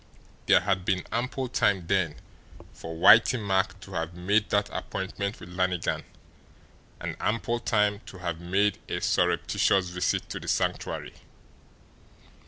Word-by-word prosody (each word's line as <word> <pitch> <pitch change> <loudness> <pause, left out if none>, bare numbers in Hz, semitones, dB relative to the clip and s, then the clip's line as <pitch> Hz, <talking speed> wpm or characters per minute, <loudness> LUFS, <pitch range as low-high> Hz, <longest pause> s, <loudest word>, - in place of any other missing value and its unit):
There - - +6
had 95 -1 0
been 95 -1 0
ample 125 +2 -2
time 100 -7 +1
then 90 -4 +1 0.6
for 80 0 -8
Whitey 110 +8 +7
Mack 95 -1 0
to 95 - -11
have 80 0 -3
made 100 +4 +1
that 105 0 +2
appointment 100 +2 -4
with 90 - -11
Lannigan 90 -1 -1 0.9
and - - -4
ample 115 +2 -1
time 105 -3 +1
to 95 - -10
have 85 -3 -4
made 100 +4 +1
a - - -1
surreptitious 95 -2 +2
visit 90 -1 -1
to - - -4
the - - -10
Sanctuary. - - -1
95 Hz, 135 wpm, -27 LUFS, 90-105 Hz, 0.9 s, Whitey